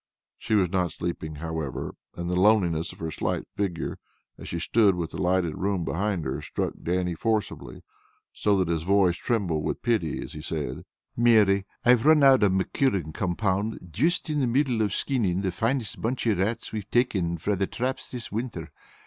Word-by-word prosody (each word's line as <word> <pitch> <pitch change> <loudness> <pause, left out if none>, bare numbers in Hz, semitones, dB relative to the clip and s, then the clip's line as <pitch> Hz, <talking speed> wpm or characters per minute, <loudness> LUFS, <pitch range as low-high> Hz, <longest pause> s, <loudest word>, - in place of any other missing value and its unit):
She 110 - 0
was 95 -4 +2
not 90 -3 +1
sleeping, 80 -3 -4
however, 80 -3 -4 0.2
and 85 0 -4
the 90 - -1
loneliness 90 -5 +3
of - - -14
her 80 -1 -4
slight - - -2
figure, 95 -4 -2 0.4
as - - -10
she 85 - -3
stood 100 +2 +3
with 85 -2 -3
the - - -5
lighted 90 -3 +1
room 95 -3 0
behind 95 -1 -1
her, 65 - -3
struck - - -3
Dannie 90 0 0
forcibly, 110 +4 -2 0.5
so 105 -1 +1
that 95 -2 +1
his 85 -1 0
voice 95 0 +3
trembled 90 -7 -1
with - - -3
pity 110 - 0
as - - -9
he 75 - -7
said: 75 -5 -4 0.3
"Mary, 105 -5 +4 0.2
I've 125 +2 +5
run 155 -2 +6
out 135 -1 +7
o' 105 - +5
my 95 0 +2
curing 95 - +1
compound 95 +2 -1
juist 160 - +1
in 150 -1 0
the 130 - +2
midst 130 +2 +2
of 110 -3 +1
skinning 100 -6 0
the 95 -2 -1
finest 115 +4 -2
bunch 120 +3 -1
o' 115 - +4
rats 100 +5 -2
we've 105 -1 -5
taken 95 -9 +1
frae 95 +6 -1
the 95 0 0
traps 130 +2 -3
this 120 -3 -7
winter. 105 -9 -4
95 Hz, 190 wpm, -26 LUFS, 85-115 Hz, 0.5 s, out